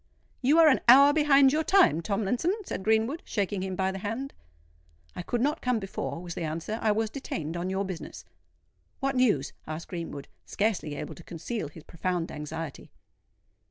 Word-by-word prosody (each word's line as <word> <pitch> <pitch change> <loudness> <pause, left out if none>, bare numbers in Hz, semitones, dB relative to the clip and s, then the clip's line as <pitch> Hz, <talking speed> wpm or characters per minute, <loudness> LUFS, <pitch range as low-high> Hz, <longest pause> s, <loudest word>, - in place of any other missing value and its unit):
"You 280 +5 +4
are 330 -1 +8
an 285 - +4
hour 280 +4 +8
behind 280 -3 +5
your 315 +1 +1
time, 350 - +4
Tomlinson," 220 - 0
said - - -4
Greenwood, 220 - +1
shaking 200 -2 -2
him 190 0 -3
by 190 0 0
the 195 - -6
hand. 230 +8 -4 0.8
"I - - -4
could 235 +6 -2
not 295 +4 0
come 250 -2 +1
before," 195 -4 -4
was 175 -1 -6
the - - -6
answer: 165 +7 -3
"I 220 - +3
was 220 +1 0
detained 165 - -5
on 175 +2 -2
your 190 +1 -1
business." 185 -3 -7 0.7
"What 275 0 -1
news?" 215 - +2
asked 155 +2 -6
Greenwood, 165 -5 -6 0.2
scarcely 200 -8 -1
able - - -6
to 170 - -13
conceal 175 +3 -5
his 150 +2 -13
profound 175 0 -3
anxiety. 150 0 -6
205 Hz, 175 wpm, -28 LUFS, 170-260 Hz, 0.8 s, are